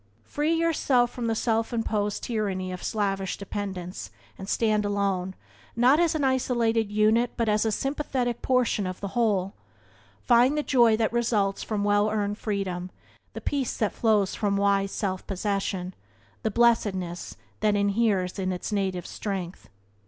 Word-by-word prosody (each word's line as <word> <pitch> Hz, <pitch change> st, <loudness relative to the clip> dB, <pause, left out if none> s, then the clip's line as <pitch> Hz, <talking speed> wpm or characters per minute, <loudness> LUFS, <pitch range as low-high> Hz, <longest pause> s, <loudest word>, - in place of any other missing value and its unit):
Free 305 Hz, +3 st, 0 dB
yourself 285 Hz, -7 st, +2 dB
from 240 Hz, -2 st, -4 dB
the 225 Hz, -, 0 dB
self 225 Hz, 0 st, 0 dB
imposed 210 Hz, -3 st, -1 dB
tyranny 195 Hz, -5 st, -2 dB
of 180 Hz, -, -6 dB
slavish 195 Hz, -3 st, -1 dB
dependence, 190 Hz, -3 st, -5 dB, 0.3 s
and 190 Hz, +1 st, -8 dB
stand 215 Hz, -2 st, +2 dB
alone, 195 Hz, -2 st, -1 dB, 0.4 s
not 250 Hz, +6 st, +5 dB
as 340 Hz, -2 st, +2 dB
an 300 Hz, -, 0 dB
isolated 235 Hz, -4 st, +1 dB
unit, 215 Hz, +3 st, +3 dB
but 230 Hz, -, 0 dB
as 210 Hz, +1 st, +2 dB
a 220 Hz, -, +1 dB
sympathetic 260 Hz, -1 st, -2 dB
portion 250 Hz, -6 st, +1 dB
of 185 Hz, 0 st, -5 dB
the 200 Hz, -, -4 dB
whole. 200 Hz, -4 st, 0 dB, 0.7 s
Find 250 Hz, +4 st, +4 dB
the 300 Hz, -, 0 dB
Joy 235 Hz, -6 st, +4 dB
that 225 Hz, 0 st, 0 dB
results 215 Hz, -5 st, +1 dB
from 210 Hz, -2 st, -2 dB
well 205 Hz, +1 st, +3 dB
earned 210 Hz, -1 st, -2 dB
freedom, 190 Hz, -4 st, -3 dB, 0.4 s
the -, -, -7 dB
peace 275 Hz, -4 st, -2 dB
that 215 Hz, -3 st, 0 dB
flows 210 Hz, -4 st, +2 dB
from 200 Hz, -2 st, 0 dB
wise 200 Hz, 0 st, +2 dB
self 190 Hz, -3 st, -3 dB
possession, 195 Hz, -2 st, -2 dB, 0.5 s
the 220 Hz, -, 0 dB
blessedness 195 Hz, -6 st, +1 dB, 0.2 s
that 210 Hz, -1 st, +2 dB
inheres 200 Hz, -2 st, +1 dB
in 185 Hz, -1 st, -1 dB
native 190 Hz, -3 st, -1 dB
strength. 190 Hz, -4 st, -5 dB
210 Hz, 150 wpm, -26 LUFS, 195-235 Hz, 0.7 s, not